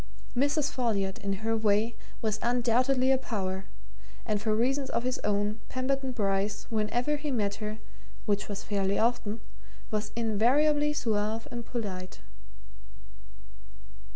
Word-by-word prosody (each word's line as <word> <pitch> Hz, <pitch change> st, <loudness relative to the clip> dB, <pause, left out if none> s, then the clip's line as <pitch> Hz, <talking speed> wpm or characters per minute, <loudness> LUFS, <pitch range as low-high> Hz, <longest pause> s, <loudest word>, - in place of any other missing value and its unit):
Mrs. 285 Hz, +3 st, +2 dB
Folliot, 205 Hz, -7 st, 0 dB
in 200 Hz, +1 st, -3 dB
her 225 Hz, 0 st, +2 dB
way, 220 Hz, +1 st, +2 dB, 0.3 s
was 215 Hz, -1 st, +1 dB
undoubtedly 250 Hz, +2 st, +3 dB
a 265 Hz, -, +4 dB
power 190 Hz, -6 st, -2 dB, 0.6 s
and 210 Hz, -1 st, 0 dB
for 215 Hz, 0 st, +2 dB
reasons 265 Hz, +4 st, +1 dB
of -, -, 0 dB
his 255 Hz, 0 st, -1 dB
own 210 Hz, +1 st, 0 dB
Pemberton 265 Hz, +1 st, 0 dB
Bryce, 205 Hz, -2 st, 0 dB
whenever 240 Hz, +7 st, +1 dB
he 295 Hz, 0 st, -3 dB
met 210 Hz, -5 st, 0 dB
her 215 Hz, 0 st, -3 dB, 0.5 s
which 205 Hz, -1 st, +1 dB
was 205 Hz, -, -4 dB
fairly 200 Hz, -1 st, +1 dB
often 225 Hz, -2 st, +1 dB, 0.5 s
was 210 Hz, 0 st, -1 dB
invariably 270 Hz, +7 st, +3 dB
suave 220 Hz, -4 st, 0 dB
and 235 Hz, -1 st, -5 dB
polite. 190 Hz, -6 st, -4 dB
225 Hz, 125 wpm, -29 LUFS, 205-255 Hz, 0.6 s, a